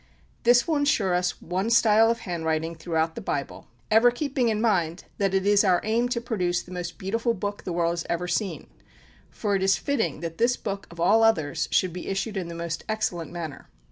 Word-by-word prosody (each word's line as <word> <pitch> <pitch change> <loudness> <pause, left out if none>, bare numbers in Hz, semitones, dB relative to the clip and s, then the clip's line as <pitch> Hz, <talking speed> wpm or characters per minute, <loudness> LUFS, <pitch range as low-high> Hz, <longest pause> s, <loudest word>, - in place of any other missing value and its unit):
This 240 0 +4
will 320 -3 +1
insure 285 -11 +2
us 180 0 0
one 185 +5 -1
style 225 -1 +5
of 230 0 -1
handwriting 165 -4 -2
throughout 160 -1 -1
the - - -7
Bible; 140 -1 -4 0.2
ever 225 +3 +6
keeping 255 -1 -1
in 215 -1 0
mind 180 -7 +1 0.2
that 195 -1 +1
it 190 0 +1
is 205 0 +5
our 185 -3 +4
aim 230 +3 +1
to 245 - -1
produce 185 -7 -1
the 180 - -14
most 175 -1 -5
beautiful 230 +5 -1
book 205 +1 -4
the 180 - -3
world 170 0 +1
has 170 -1 -4
ever 175 +1 -1
seen, 190 +3 -2 0.6
for 205 -2 -2
it 195 - 0
is 195 0 +4
fitting 270 - -1
that 165 -1 -6
this 240 +2 +3
book, 200 -1 -5
of 170 - -13
all 205 +7 +4
others, 160 -11 +2
should 185 -3 +2
be 180 - -7
issued 195 +3 -2
in 185 -3 -3
the 170 - -7
most 170 -1 -4
excellent 215 -7 -2
manner." 165 -4 -7
195 Hz, 210 wpm, -25 LUFS, 170-225 Hz, 0.6 s, ever